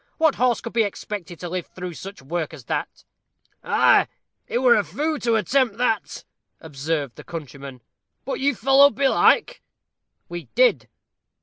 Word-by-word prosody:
What 315 -3 +3
horse 245 -1 +1
could 230 - -7
be 230 - +3
expected 200 -4 -5
to 175 - -5
live 180 0 -4
through 180 -1 -7
such 190 -2 -10
work 160 +2 -4
as 130 -6 -14
that?" - - -4 0.6
"Ah, - - +4 0.4
he - - -1
were 250 -1 +5
a 210 - +2
foo' 305 +5 -2
to 230 -1 +1
attempt 230 +1 +1
that," 225 -4 -1 0.3
observed 145 -3 -4
the - - -10
countryman; 140 -5 -9 0.4
"but 270 - -3
you 280 0 +1
followed 270 +5 +5
belike?" 445 - +3 0.7
"We 175 -1 -7
did." - - +3
210 Hz, 150 wpm, -23 LUFS, 165-265 Hz, 0.7 s, were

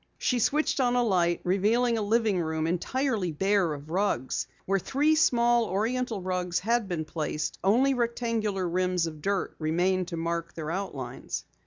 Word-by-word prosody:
She 250 - 0
switched 305 +6 +1
on 245 -2 +2
a 245 - +3
light, 175 -6 +1
revealing 220 +6 +2
a 225 - -1
living 210 -3 +2
room 160 -1 -1
entirely 205 - -1
bare 190 +2 +1
of 150 +1 -7
rugs. 180 -9 0 0.2
Where 195 +1 +1
three 290 - +2
small 240 -6 +3
Oriental 220 +1 -1
rugs 180 -1 -1
had 230 +1 +1
been 170 -4 -3
placed, 155 -1 -3
only 245 +8 +4
rectangular 230 -5 -1
rims 180 0 +1
of 155 -2 -7
dirt 195 +3 -1
remained 175 +3 +1
to 170 - -5
mark 170 0 -3
their 160 -1 -4
outlines. 145 -10 -5
195 Hz, 160 wpm, -28 LUFS, 170-235 Hz, 0.2 s, only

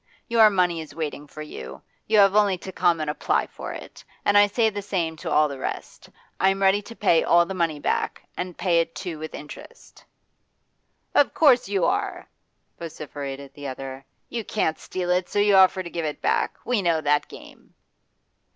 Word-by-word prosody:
Your 225 -2 +6
money 180 -4 +1
is 155 - -11
waiting 150 -2 -5
for 155 +2 -9
you: 65 - -9 0.2
you 215 - +3
have 200 -1 +6
only 205 -3 +3
to 190 - -8
come 175 -2 +2
and 155 - -3
apply 150 - 0
for - - -8
it. - - -10 0.2
And 205 - +3
I 205 0 +7
say 220 +2 +1
the 205 0 -4
same 175 -5 -2
to - - -6
all 150 0 +4
the 140 -2 -7
rest. - - -6 0.3
I 190 - +4
am 195 0 -1
ready 195 +2 +4
to 230 +3 -12
pay 170 -7 +3
all 170 0 +4
the 190 - -5
money 165 -5 -1
back, - - -2
and 180 -1 -5
pay 175 -3 +2
it 165 0 -2
too 170 -5 -6
with 155 0 -7
interest.' 475 - -12 1.1
'Of 290 - +3
course 255 -9 +4
you 195 -4 +1
are!' - - -1 0.5
vociferated 140 -4 -7
the 145 -1 -8
other. 135 0 -7 0.2
'You 235 -2 -4
can't 160 -7 -1
steal 180 -1 -3
it, 180 0 +1
so - - -4
you 205 0 +4
offer 190 0 +5
to 170 - -7
give 170 -2 -3
it 150 - -4
back. - - 0
We 245 -4 +1
know 170 -3 +1
that 145 0 +1
game. - - -15
175 Hz, 195 wpm, -24 LUFS, 155-200 Hz, 1.1 s, I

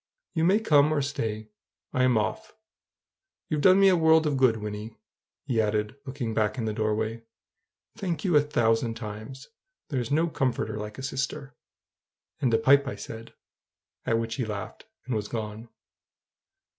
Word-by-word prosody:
You 160 -1 +1
may 195 +5 +4
come 150 -8 +4
or 145 -2 +1
stay 110 -5 -4 0.4
I'm 130 -2 +3
off. 165 - -3 0.9
You've 150 -2 0
done 185 +3 +6
me 195 0 +7
so 180 -2 +3
much 160 -2 +4
good, 130 -4 +4
Wynnie!" 105 +1 -6 0.5
he 120 -5 +1
added, 105 +2 -1
looking 130 -4 -3
back 105 +1 0
in 115 - -2
the 110 - -1
doorway. 110 +1 -1 0.7
"Thank 180 -7 -3
you 175 -4 +2
a 150 - +7
thousand 115 -5 +1
times. 115 +5 -8 0.4
There's 130 -4 -2
no 160 +4 +2
comforter 135 -7 -1
like 105 0 -7
a 130 - -7
sister!" 135 0 -4 0.8
"And 125 - +1
a 115 - +4
pipe," 140 +2 +4
I - - -3
said; 115 0 -9 0.7
at 115 - +1
which 115 0 -2
he 125 - 0
laughed, 105 0 -6 0.2
and 130 - -3
was 105 -2 -2
gone. 110 0 -5
125 Hz, 155 wpm, -27 LUFS, 110-145 Hz, 0.9 s, me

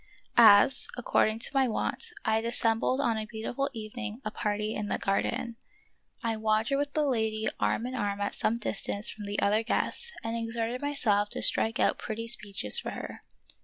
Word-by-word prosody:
As, 220 +4 +7
according 220 -2 +1
to 230 - +2
my 270 -1 +3
wont, 230 - -2 0.2
I 220 - +2
had 220 - -2
assembled 235 +2 +2
on 230 -6 +1
a 215 - -5
beautiful 240 +5 -3
evening 225 -1 -6
a 215 - -2
party 210 +1 -2
in 210 -1 -4
a - - +1
garden, 225 +3 -1 0.7
I 225 -1 -1
wandered 220 +5 +1
with 285 0 -2
the 305 -1 +1
lady 220 -4 0
arm 230 - 0
in 255 - -4
arm 205 -5 -2
at 200 - -2
some 230 - 0
distance 205 -2 0
from 210 -2 -8
the 205 0 -2
other 210 +2 +3
guests 475 - -2
and 225 0 -3
exerted 230 +1 -3
myself 220 -8 +1
to - - -4
strike 225 +1 +2
out - - +2
pretty 230 +1 -5
speeches 200 - 0
for - - -5
her. - - -7
225 Hz, 185 wpm, -29 LUFS, 215-240 Hz, 0.7 s, As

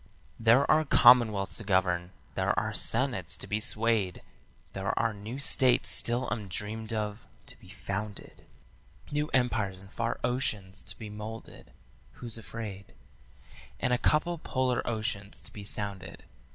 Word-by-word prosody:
"There 115 +5 +5
are 155 0 +5
commonwealths 120 -8 +5
to 110 - -5
govern, 90 -3 +1 0.2
there 95 +3 0
are 110 +2 -3
senates 105 - +1
to - - -5
be 105 - -1
swayed, 110 -4 +1 0.5
There 95 +1 -2
are 115 -1 +1
new 105 +5 -7
states 130 -2 +5
still 120 +2 0
undreamed 105 +1 -3
of 105 0 -3 0.2
to - - -4
be - - -16
founded, 100 +1 -6 0.7
New 150 +1 0
empires 110 -7 +1
in 95 0 -13
far 115 +2 -2
oceans 110 -6 -1
to - - -6
be 110 -2 -8
moulded 110 +2 -8 0.4
who's 115 -2 -2
afraid? 105 -4 -8 0.8
And 125 - +1
a 125 - +2
couple 165 +4 +1
polar 130 -4 0
oceans 105 -3 -3
to - - -8
be 105 - -8
sounded. 100 -2 -2
110 Hz, 140 wpm, -29 LUFS, 100-120 Hz, 0.8 s, There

